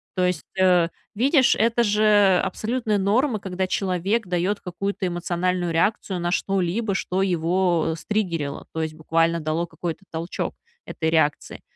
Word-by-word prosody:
То 185 -1 +2
есть, 180 -3 -1 0.2
э, 180 -2 +4 0.3
видишь, 260 +4 +4
это 230 +2 +2
же 205 -3 +4
абсолютная 220 +3 -1
норма, 220 +5 +1
когда 190 -1 -3
человек 190 +3 -1
дает 180 +3 0
какую-то 195 +2 -3
эмоциональную 175 0 -1
реакцию 190 +1 0
на 175 0 -1
что-либо, 195 +3 0
что 190 0 -1
его 175 -2 +1
стриггерило, 170 -9 -2
то 160 - -2
есть, 155 -1 -3
буквально 165 +1 +1
дало 155 +3 -1
какой-то 170 +1 -6
толчок 165 +2 -4 0.3
этой 160 -1 -2
реакции. 155 -2 0
185 Hz, 140 wpm, -23 LUFS, 170-205 Hz, 0.3 s, э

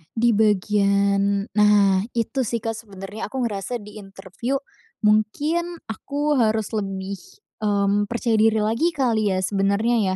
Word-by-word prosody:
Di 235 +1 +3
bagian 200 -1 +2
nah 205 -2 +4 0.2
itu 235 +4 -1
sih, 230 0 -3
Kak, 225 - -1
sebenarnya 205 -1 -7
aku 265 -2 -3
ngerasa 215 +1 -3
di 210 +1 -11
interview 195 +5 -5 0.5
mungkin 290 +12 +1 0.2
aku 290 +5 -1
harus 220 -2 +1
lebih, 195 -2 -4 0.4
mmm, 205 -1 +1
percaya 235 0 0
diri 220 0 +3
lagi 260 +11 0
kali 230 -6 +1
ya 185 - -1
sebenarnya 200 +1 +1
210 Hz, 130 wpm, -23 LUFS, 200-230 Hz, 0.5 s, nah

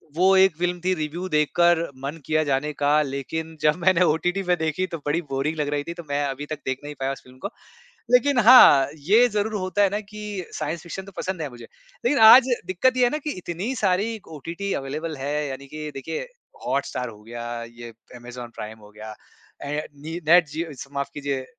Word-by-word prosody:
वो 190 +3 +4
एक 190 -3 +5
फ़िल्म 175 +1 -1
थी 185 +1 +2
रिव्यू 160 +3 -4
देखकर 165 +2 +3 0.2
मन 140 +4 -4
किया 155 0 +1
जाने 145 +1 0
का 145 +1 +2
लेकिन 150 +3 -4
जब 150 0 +3
मैंने 185 -1 +4
ओटीटी 175 +4 +1
पे 180 -1 +2
देखी 160 +2 -1
तो 170 -2 -5
बड़ी 150 +4 0
बोरिंग 135 +4 -1
लग 150 -1 -1
रही 145 0 -1
थी, 170 - -6
तो 170 0 -9
मैं 145 0 0
अभी 140 +1 -4
तक 155 0 -6
देख 130 0 -2
नहीं 145 0 -7
पाया 135 0 -1
उस 135 - -7
फ़िल्म 130 0 -17
को, 200 - -3 0.6
लेकिन 250 +1 +4
हाँ, 220 - +8
ये 200 +11 +4
ज़रूर 210 0 -1
होता 185 +2 -1
है 200 - +4
ना 205 +2 -2
कि 210 -2 -7
साइंस 155 +2 -3
फ़िक्शन 190 +2 -7
तो 200 - -12
पसंद 185 -2 -3
है 150 - -3
मुझे, 120 -2 -12 0.4
लेकिन 270 +2 +3
आज 245 +4 +10 0.2
दिक्कत 195 +9 +1
ये 250 - +4
है 245 - +5
ना 300 - -1
कि 300 - -2
इतनी 180 +7 -4
सारी 215 +2 0 0.2
ओटीटी 170 +7 -5
अवेलेबल 155 +4 -4
है, 145 +2 -2
यानी 140 0 -7
कि 155 +2 -6
देखिए 160 - -5 0.4
हॉटस्टार 125 -3 -2
हो 105 -2 -13
गया, 120 +1 -6
ये 120 0 -10 0.3
अमेज़न 120 0 -9
प्राइम 110 +1 -8
हो 105 -1 -16
गया, 110 +1 -9 0.5
ए 150 +2 -3
नी 160 +4 -6
नेट 170 0 +6
जियो 160 +2 -4
स - - -16
माफ़ 140 0 -2
कीजिए 140 -2 -3
155 Hz, 210 wpm, -24 LUFS, 140-185 Hz, 0.6 s, आज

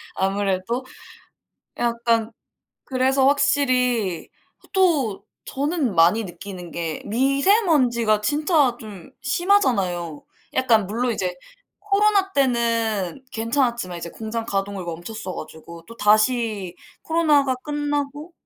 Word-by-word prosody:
아무래도? 195 +5 -1 0.9
약간 235 -1 0 0.6
그래서 265 +1 +2
확실히 255 - +1 0.4
또 305 - +2 0.2
저는 285 - -1
많이 175 +7 +4
느끼는 180 -1 -9
게 165 -2 -4
미세먼지가 265 - +2
진짜 295 - +2
좀 205 -6 -11
심하잖아요. 220 - +1 0.3
약간 225 -6 +3
물론 240 +4 -1
이제 180 -4 -2 0.4
코로나 405 -1 +2
때는 230 -5 0
괜찮았지만 230 -5 -1
이제 170 - -6
공장 225 +3 -5
가동을 195 -2 -2
멈췄어 180 +4 -6
가지고. 165 +2 -10
또다시 215 -4 +1 0.3
코로나가 300 -5 +2
끝나고 290 +1 -3
235 Hz, 235 characters per minute, -22 LUFS, 195-280 Hz, 0.9 s, 많이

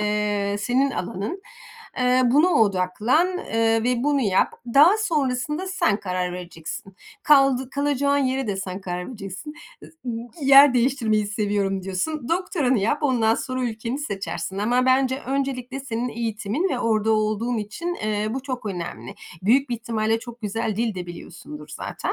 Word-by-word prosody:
eee, 210 -1 0
senin 260 +5 +1
alanın. 205 - -4 0.6
Eee 250 0 +3
buna 290 +9 +4
odaklan, 220 - +2
eee, 225 -3 +1
ve 245 0 +1
bunu 290 -1 +2
yap. 200 -6 +2 0.2
Daha 325 +9 +7
sonrasında 300 -2 -1
sen 220 - +1
karar 180 -1 -2
vereceksin. 180 +1 -8 0.3
Kaldı 270 -3 +4
kalacağın 285 0 +1
yere 265 -1 0
de 200 -2 -2
sen 190 0 -5
karar 180 -1 -5
vereceksin. 210 +5 -7 0.9
Yer 275 0 +8
değiştirmeyi 235 -4 +2
seviyorum 205 -2 -1
diyorsun. 235 +9 -3
Doktoranı 330 - +1
yap, 230 +10 0
ondan 230 -5 +3
sonra 255 +1 -3
ülkeni 230 +2 -3
seçersin 195 -6 -4
ama 245 +5 +2
bence 260 +1 +2
öncelikle 270 -1 -2
senin 245 -2 -3
eğitimin 230 - -2
ve 265 - -1
orada 220 -2 +1
olduğun 215 +2 0
için, 220 +12 -4
eee, 215 -6 -2
bu 265 +2 -3
çok 255 -5 -5
önemli. 170 - -5 0.3
Büyük 260 +8 +3
bir - - +1
ihtimalle 225 -1 -1
çok 240 0 -11
güzel 215 0 -2
dil 225 -1 0
de 180 -1 -5
biliyorsundur 165 -3 -10
zaten. - - -4
235 Hz, 145 wpm, -23 LUFS, 205-270 Hz, 0.9 s, Yer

